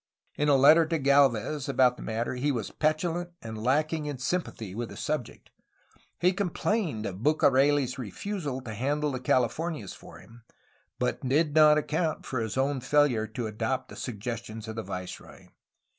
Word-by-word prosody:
In 150 0 +1
a 145 - +6
letter 155 +4 +6
to 165 0 0
Gdlvez 140 -1 +2
about 130 -2 +4
the - - -12
matter 115 +3 -2
he 135 +4 0
was 115 -6 -3
petulant 170 +3 -1
and 110 -1 -7
lacking 150 +4 +1
in 145 -2 -4
sympathy 130 - -3
with 115 +2 -4
the - - -10
subject. 150 -6 -4 0.7
He 180 +2 +3
complained 180 - -1
of 95 -1 -5
BucareU's 140 -1 +3
refusal 140 - -4
to 110 -4 -7
handle 145 +6 -1
the 130 - -3
Cahfornias 130 - 0
for - - -13
him, 120 +1 -16 0.6
but - - -1
did 150 +2 +2
not 155 -1 +7
account 155 +1 -1
for 130 - -3
his 110 +1 -3
own 135 +1 +1
failure 135 -5 +2
to 110 +2 -5
adopt 115 +4 -2
the - - -10
suggestions 110 -1 -6
of 110 - -6
the - - -1
viceroy. 90 -3 -8
135 Hz, 165 wpm, -28 LUFS, 115-155 Hz, 0.7 s, not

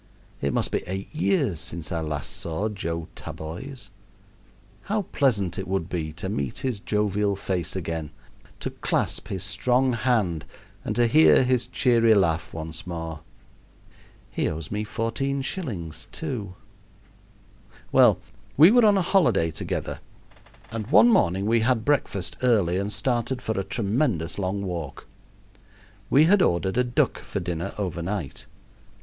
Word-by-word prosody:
It 70 - 0
must - - 0
be - - 0
eight 95 - -5
years 140 - +1
since 80 -1 -5
I 85 -1 -1
last 75 -3 -3
saw 85 +6 -2
Joseph 85 -5 -4
Taboys. 105 - -7 0.9
How 210 0 0
pleasant 110 - 0
it 95 - -5
would 95 -2 -2
be 80 -4 -3
to 95 - -5
meet 70 -9 -3
his 125 -6 -1
jovial 105 -1 0
face 90 -4 -3
again, 80 -4 -3 0.5
to - - -3
clasp - - -1
his 95 -1 -4
strong 125 +5 +1
hand, 110 -10 +1 0.4
and - - -3
to 120 - +4
hear 150 +2 +6
his 125 -2 +1
cheery 115 -3 +4
laugh 85 -5 +1
once 80 +1 -6
more! 80 -2 -5 1.1
He - - 0
owes 80 0 -6
me 105 +1 -1
14 120 +6 -2
shillings, 100 - -5
too. 120 - -5 1.4
Well, - - +6 0.4
we 160 +7 +9
were 245 0 +6
on 205 -1 +5
a 190 - +2
holiday 175 - +3
together, 80 - -4 0.7
and 115 -2 -4
one 235 - +7
morning 95 - +3
we 115 +2 +3
had 115 -1 +1
breakfast 100 -11 0
early 105 -9 +3
and 100 +1 -2
started 120 +3 0
for 120 - -3
a - - -1
tremendous 100 - 0
long 100 +1 -2
walk. 85 -7 -5 1.0
We 145 - +6
had 190 +4 +5
ordered 95 - +1
a - - +4
duck 120 -1 0
for - - -5
dinner 85 -1 -4
over 90 -4 -3
night. 90 -5 -4
100 Hz, 145 wpm, -25 LUFS, 85-125 Hz, 1.4 s, we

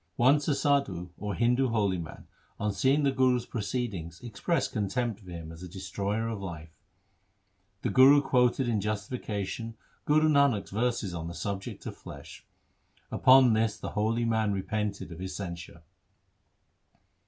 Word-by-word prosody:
Once 140 +4 +4
a 145 - +2
sadhu, 100 -14 0
or 105 -1 -3
Hindu 125 +3 +2
holy 100 -6 +1
man, 80 - -9 0.3
on 105 -1 -1
seeing 135 +9 +2
the 140 - +3
Guru's 130 -2 +2
proceedings 100 -8 -4
expressed 120 +9 -1
contempt 110 +1 -1
for 95 -4 -14
him 85 -2 -7
as 80 +1 -11
a 90 - -8
destroyer 100 +4 -3
of 110 -3 -4
life. 80 -4 -7 1.1
The - - 0
Guru 135 +3 +7
quoted 125 -2 +2
in 110 -4 +1
justi 105 +3 -3
fication 110 +2 -4 0.3
Guru 155 +1 +4
Nanak's 140 -9 +3
verses 110 -3 -1
on 85 -1 -4
the 85 - -7
subject 100 -1 -5
of - - -5
flesh. 70 +3 -11 0.7
Upon 130 -2 +6
this 110 -1 +1
the - - -5
holy 110 +3 0
man 110 -2 +1
repented 100 0 -3
of 85 - -9
his 95 0 -5
censure. 85 -3 -7
110 Hz, 155 wpm, -29 LUFS, 95-125 Hz, 1.1 s, Guru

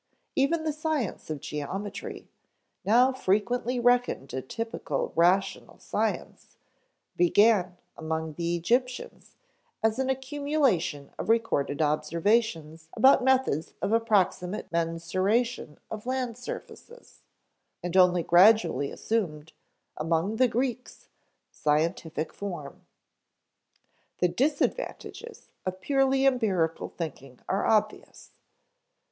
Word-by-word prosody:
Even 310 +4 +2
the 310 -1 -1
science 305 - -3
of 150 -3 -4
geometry, 195 +7 -6 0.6
now 245 +5 +4
frequently 245 +3 0
reckoned 245 - +1
a 130 - -2
typical 195 - -4
rational 185 +4 +1
science, - - -3 0.6
began, 180 0 +3 0.2
among 160 0 -3
the 170 +2 -1
Egyptians, 250 +9 -2 0.5
as 220 +2 +2
an 265 0 0
accumulation 265 - 0
of - - -4
recorded 160 -11 +1
observations 160 +1 0
about 265 0 +5
methods 260 - +1
of 210 - -1
approximate 210 -4 +1
mensuration 170 +4 -1
of 220 +2 -6
land 255 -3 -2
surfaces; 470 - -10 0.6
and 175 0 -4
only 180 -2 +5
gradually 180 -5 +5
assumed, 160 -9 -3 0.4
among 165 +7 0
the 255 - +5
Greeks, 250 +1 -3 0.4
scientific 155 +1 -1
form. 175 -8 -7 1.3
The 180 - +2
disadvantages 310 - -2
of 185 0 -4
purely 270 +4 +2
empirical 200 -11 +1
thinking 135 -6 -7
are 195 +2 0
obvious. 215 -1 -1
200 Hz, 95 wpm, -27 LUFS, 165-250 Hz, 1.3 s, about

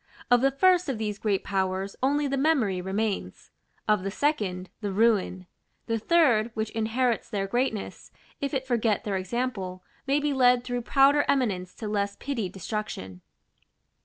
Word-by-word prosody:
Of 245 -1 +6
the 270 - +4
First 360 +5 +3
of 260 - -1
these 210 -1 -3
great 205 -3 0
powers 190 0 -1
only 290 +3 +2
the 275 0 0
memory 265 - +1
remains; 195 - -3 0.4
of 210 -2 +3
the 195 - -3
Second, 195 -8 -1
the 205 -2 -2
ruin; 195 -3 +2 0.4
the 230 -1 -1
Third, 240 -6 +3
which 220 0 -2
inherits 230 +2 0
their 195 -2 -1
greatness, 230 0 -2 0.3
if 280 - -2
it 265 -3 -2
forget 230 -5 +1
their 205 -2 -2
example, 190 -2 -3 0.2
may 280 +2 +3
be 295 -1 0
led 250 -2 +4
through 245 -1 -3
prouder 280 +4 +4
eminence 195 -9 0
to 220 - -6
less 200 -1 -1
pitied 230 -10 -3
destruction. 185 - -5
220 Hz, 160 wpm, -27 LUFS, 195-265 Hz, 0.4 s, Of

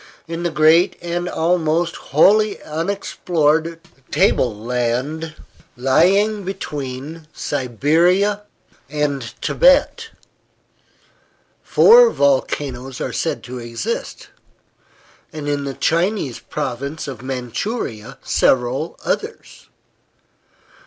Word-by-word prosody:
In 165 +1 -5
the 175 - 0
great 160 +2 +4
and 175 +1 -3
almost 165 0 0
wholly 210 +8 +3
unexplored 165 -2 -1 0.3
table 115 -5 +2
land 125 +7 -2 0.4
lying 195 - +2
between 150 -4 -6
Siberia 165 - +1 0.5
and 145 -2 -1 0.2
Tibet - - +3 1.5
four 475 +1 +6
volcanoes 135 - -1
are - - -4
said 165 - -2
to 125 0 -7
exist, 120 - -5 1.0
and 155 -3 -6
in 145 -1 -1
the 135 -1 -5
Chinese 170 - 0
province 140 +2 -5
of 130 -5 -7
Manchuria 130 - -4
several 130 +5 +1
others. - - -4
155 Hz, 85 wpm, -19 LUFS, 130-175 Hz, 1.5 s, four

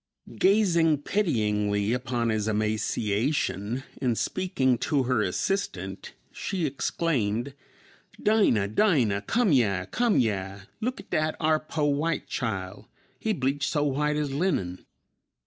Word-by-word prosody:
Gazing 170 -7 +3
pityingly 105 - +1
upon 120 -2 -1
his 110 -1 0
emaciation, 110 +2 -1 0.2
and 120 -4 +1
speaking 130 -9 0
to 145 -4 +1
her 125 -3 +1
assistant, 95 - -2 0.2
she 185 -5 -3
exclaimed, 135 -4 -1 0.7
"Dinah, 195 - +3
Dinah, 115 - +2
come 230 - +1
yeah, 100 -9 +2
come 235 - +1
yeah; 100 -4 -1 0.2
look 250 +4 -2
at - - -13
dat 155 0 +1
ar' 155 -1 +3
po' 155 -1 -2
white 150 +3 0
chile; 100 -7 -4 0.3
he 220 - -1
bleached 140 -4 0
so 145 - +1
white 150 +1 0
as 150 -2 -1
linen!" 135 - -1
130 Hz, 120 wpm, -27 LUFS, 105-160 Hz, 0.7 s, Gazing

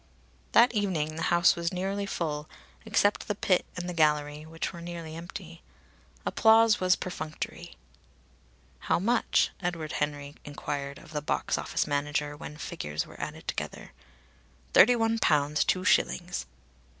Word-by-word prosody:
That 245 +2 +6
evening 175 -8 0
the 165 - -5
house 175 0 +5
was 170 0 -2
nearly 195 +2 -2
full, 150 -5 -3 0.4
except 210 -2 +2
the 210 - -1
pit 185 -2 +1
and 180 0 -4
the 180 - -3
gallery, 150 -1 +1
which 165 +3 -4
were 170 - -8
nearly 170 -2 -7
empty. 170 0 -9 0.6
Applause 225 0 +5
was 185 0 +4
perfunctory. 160 -4 -6 1.1
"How - - +4
much?" 230 +7 +2
Edward 170 -4 -3
Henry 145 -1 -2
enquired 145 -1 -5
of 155 - -14
the 150 - -1
box 150 - 0
office - - -1
manager 145 0 -1
when 150 0 -9
figures 75 - -4
were - - -11
added - - -6
together. - - -5 0.8
"Thirty 245 - +8
one 225 -1 +1
pounds 150 -3 +3
two 185 - +1
shillings." 65 0 +1
165 Hz, 140 wpm, -28 LUFS, 150-185 Hz, 1.1 s, Thirty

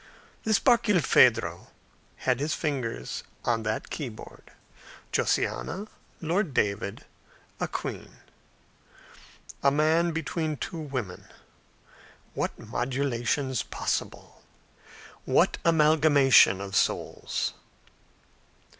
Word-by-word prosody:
This 220 -2 +4
Barkilphedro 210 - +3 0.6
had 125 -1 +2
his 145 +2 -1
fingers 125 - -3 0.2
on 115 -2 +1
that 110 0 -3
keyboard 125 -8 -8 0.6
Josiana, 205 +4 -1 0.3
Lord 165 -2 -1
David, 100 -1 -1 0.5
a - - -1
queen. - - -6 1.4
A 140 - +5
man 160 +4 +2
between 160 -1 -2
two 170 +3 -5
women. 130 - -5 1.1
What - - -3
modulations 130 +2 -1
possible! - - -4 0.8
What - - +2
amalgamation 150 - +5
of 100 0 -6
souls! - - -1
140 Hz, 80 wpm, -27 LUFS, 120-160 Hz, 1.4 s, A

